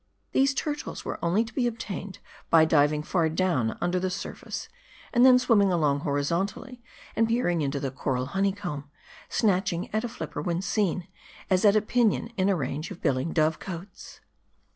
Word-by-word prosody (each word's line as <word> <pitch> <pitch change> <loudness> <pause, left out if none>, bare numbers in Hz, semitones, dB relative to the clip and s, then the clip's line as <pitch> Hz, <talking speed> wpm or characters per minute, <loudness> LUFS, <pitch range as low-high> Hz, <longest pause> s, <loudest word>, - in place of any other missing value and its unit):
These 270 0 +3
turtles 295 +2 -4
were - - -5
only 180 +6 +2
to 235 - -10
be 250 -3 +1
obtained 200 -4 -5 0.3
by 160 -1 +6
diving 150 -1 +3
far 165 -1 +1
down 160 -9 0
under 180 +1 +1
the 185 +1 -1
surface; 185 - -6 0.5
and 240 -1 +5
then 255 -1 +8
swimming 225 -6 +3
along 150 -5 +2
horizontally, 170 - -2 0.3
and 225 0 +3
peering 225 -8 +1
into 140 -1 -1
the 135 -1 -3
coral 130 -1 -2
honeycomb; 190 -4 -2 0.4
snatching 190 -4 0
at 215 +1 0
a 240 - -3
flipper - - -6
when 175 0 -2
seen, 195 -3 0 0.4
as 185 -1 +3
at 205 0 +6
a 215 - +3
pinion 230 -1 +1
in 190 +1 +2
a 195 - +3
range 150 +1 -3
of - - -9
billing 140 +1 0
dove 155 0 +1
cotes. 190 +1 -9
185 Hz, 170 wpm, -27 LUFS, 155-215 Hz, 0.5 s, then